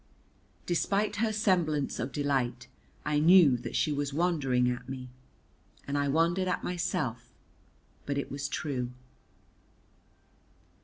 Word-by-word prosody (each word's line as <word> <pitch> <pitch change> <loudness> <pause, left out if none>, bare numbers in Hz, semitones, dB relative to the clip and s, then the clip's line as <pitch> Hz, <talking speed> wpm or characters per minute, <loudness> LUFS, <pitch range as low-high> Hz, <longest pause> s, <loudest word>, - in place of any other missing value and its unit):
Despite 200 +4 0
her 220 +1 +1
semblance 175 -9 +1
of 130 +3 -3
delight 140 -4 -1 0.4
I 150 0 +1
knew 165 -4 +7
that 120 - -7
she 155 - +2
was 145 -1 -2
wondering 145 -8 +2
at 125 +1 -3
me, 130 -1 -6 0.8
and 140 - -2
I 145 0 +1
wondered 170 +6 +2
at 180 - -1
myself, 125 -9 -2 0.8
but 140 -1 -1
it 140 - -3
was 140 +1 -3
true. 125 -4 -3
145 Hz, 120 wpm, -29 LUFS, 135-175 Hz, 0.8 s, knew